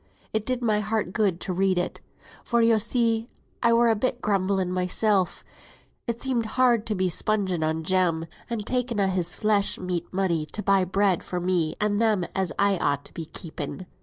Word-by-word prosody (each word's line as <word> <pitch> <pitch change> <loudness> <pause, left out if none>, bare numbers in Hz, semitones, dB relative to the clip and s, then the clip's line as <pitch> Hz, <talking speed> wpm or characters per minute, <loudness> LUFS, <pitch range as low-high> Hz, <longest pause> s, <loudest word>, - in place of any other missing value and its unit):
It 220 0 -1
did 255 -1 -1
my 215 -2 +2
heart 210 -3 -2
good 200 -5 +1
to 185 - -2
read 190 0 +1
it; 180 - -2 0.4
for, 235 - +1
yo 230 -1 +4
see, 230 0 +1 0.3
I 235 - +4
were 235 +1 +4
a 225 - +4
bit 245 +3 -1
grumbling 190 -3 0
mysel; 185 +1 +2 0.8
it 235 0 -2
seemed 245 -4 -1
hard 240 -4 +3
to 215 - 0
be 185 -1 +1
spunging 190 -1 0
on 160 +1 -1
Jem, 170 -2 +1 0.2
and 225 -3 -3
taking 250 -2 -1
a' 200 - +3
his 180 -2 0
flesh 210 -2 +1
meat 180 -2 -4
money 175 -5 0
to 210 - -6
buy 195 -2 +3
bread 195 -1 +1
for 180 - -3
me 175 -3 0
and 210 0 +1
them 215 -6 +2
as 190 -3 0
I 200 -2 +2
ought 140 - 0
to - - -10
be 165 - -6
keeping. 160 +1 -7
200 Hz, 195 wpm, -25 LUFS, 180-225 Hz, 0.8 s, yo